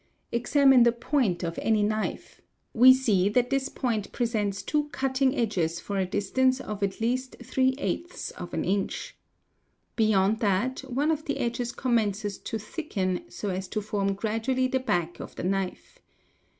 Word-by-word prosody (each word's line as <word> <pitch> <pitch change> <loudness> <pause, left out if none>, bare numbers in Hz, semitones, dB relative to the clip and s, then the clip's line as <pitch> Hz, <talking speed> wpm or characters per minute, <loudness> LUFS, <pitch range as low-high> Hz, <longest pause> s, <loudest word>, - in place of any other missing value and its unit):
Examine 265 +2 +5
the 235 0 +6
point 235 - 0
of 165 -1 -3
any 215 -2 +2
knife; 215 +1 -3 0.3
we 250 +3 +8
see 215 -8 +3
that 245 +4 +1
this 275 0 0
point 225 -6 -2
presents 210 -4 -1
two 300 -1 0
cutting 265 0 +1
edges 180 - 0
for 200 - -4
a 190 - 0
distance 255 +7 +1
of 210 -5 -6
at 195 -1 -1
least 250 +3 -1
2 260 0 +1
inch. 205 - -3 0.8
Beyond 215 -1 +3
that, 215 +4 +1
one 285 +6 +1
of 310 -1 -2
the 285 - -1
_ - - -6
edges 240 0 -1
commencés 215 -5 -1
to 225 - -2
thicken 205 - -3
so 205 - -5
as 185 0 -3
to 215 - -2
form 200 -2 -1
gradually 225 +5 0
the 260 +1 0
back 175 -9 -1
of - - -8
the - - -6
knife. 190 0 -3
225 Hz, 155 wpm, -27 LUFS, 200-260 Hz, 0.8 s, we